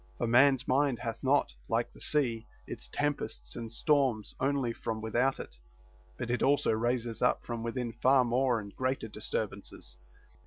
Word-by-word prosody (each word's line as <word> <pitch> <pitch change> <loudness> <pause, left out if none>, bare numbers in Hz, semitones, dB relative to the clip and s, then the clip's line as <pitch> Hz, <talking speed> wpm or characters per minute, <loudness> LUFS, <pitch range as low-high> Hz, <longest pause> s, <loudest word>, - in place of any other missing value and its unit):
For - - 0
man's 130 +3 +5
mind 135 -1 +2
hath 115 -1 -5
not, 135 - +3 0.2
like - - 0
the - - -15
sea, 120 -7 0 0.2
its - - -6
tempests 145 0 -3
and 115 -1 -6
storms 130 -5 +1
only 135 -3 +1
from 110 -1 -4
without 120 +5 +1
it, - - -9 0.6
but 120 0 -3
it 125 - 0
also 145 +1 +3
raises 120 +1 -1
up 125 - +2
from 120 -1 -4
within 115 0 -3
far 130 +1 +4
more 125 0 +2
and 100 -2 -9
greater 130 -2 -1
disturbances. 105 -1 -4
120 Hz, 160 wpm, -31 LUFS, 115-135 Hz, 0.6 s, man's